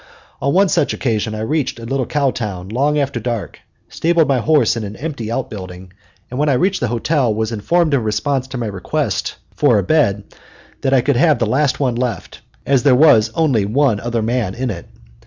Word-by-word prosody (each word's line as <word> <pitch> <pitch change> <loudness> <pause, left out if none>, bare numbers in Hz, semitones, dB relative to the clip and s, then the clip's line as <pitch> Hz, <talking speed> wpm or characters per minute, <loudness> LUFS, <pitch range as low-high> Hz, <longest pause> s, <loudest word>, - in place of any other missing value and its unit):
On 140 - +1
one 195 +4 +4
such 165 - +1
occasion 110 -3 -1
I 110 - -5
reached 140 +5 -1
a 115 - -9
little 135 0 -2
cow 140 -3 +1
town 95 -6 -5
long 140 +7 +1
after 140 -4 -1
dark, 115 -2 -4 0.3
stabled 165 -1 +1
my 135 -2 +2
horse 145 -3 +2
in 115 - -4
an 105 0 -6
empty 140 -6 -5
outbuilding, 95 -7 -6 0.4
and 125 - -4
when 150 0 +2
I - - +3
reached 185 +9 +1
the 125 - -1
hotel 120 +2 0
was 110 +1 -2
informed 155 +9 +1
in 135 - +2
response 125 +5 -1
to 130 0 -6
my 120 - -3
request 95 -4 -2 0.2
for - - +3
a 100 - +1
bed 105 - +2 0.6
that 135 - 0
I 130 - +4
could 135 0 +1
have 155 0 +4
the 115 - 0
last 135 +5 +1
one 130 -4 +1
left, 120 -1 -4 0.2
as 135 -2 +3
there 135 -2 +4
was 125 -6 +5
only 140 -10 +2
one 115 +1 +1
other 115 -1 -2
man 115 -4 -1
in 125 0 -2
it. 85 -4 -8
125 Hz, 210 wpm, -18 LUFS, 110-140 Hz, 0.6 s, was